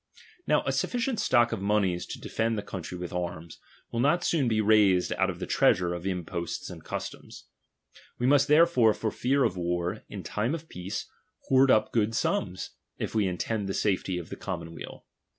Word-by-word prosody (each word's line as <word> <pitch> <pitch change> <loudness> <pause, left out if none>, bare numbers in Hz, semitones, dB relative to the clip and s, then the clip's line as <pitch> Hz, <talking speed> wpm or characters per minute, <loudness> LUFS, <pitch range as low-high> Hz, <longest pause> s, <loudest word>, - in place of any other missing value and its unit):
' 470 - -20
' 440 - -25
' 360 - -36
Now - - +3
a - - +1
sufficient 245 -1 -1
stock 120 -1 +3
of 115 -4 -3
monies 100 -3 +1
to - - -7
defend 115 0 -1
the 105 - -3
country 90 -1 -6
with 90 0 -6
arms, 85 -2 -5 0.3
will 115 - -2
not 150 +8 +3
soon 155 -8 +1
be 110 -2 +1
raised 105 -4 +4
out - - +1
of - - -4
the - - -4
treasure 90 -1 +3
of 85 +2 -5
imposts 85 -2 -4
and - - -10
customs. - - -7 0.7
We 125 - -1
must 140 +1 +4
therefore, 150 -8 +5
for 110 - -2
fear 135 +2 +1
of 100 -6 0
war, 85 0 -2
in - - -7
time 115 +9 -1
of 165 0 -9
peace 95 +4 -5 0.4
hoard 135 0 +5
up 110 -3 +4
good 110 -1 +1
sums, 95 -4 -1 0.3
if - - -4
we 105 -3 +2
intend 100 +3 -2
the 95 - -2
safety 95 -3 0
of 85 - -6
the - - -5
com - - -4
monweal. 85 0 -9
105 Hz, 205 wpm, -28 LUFS, 90-125 Hz, 0.7 s, therefore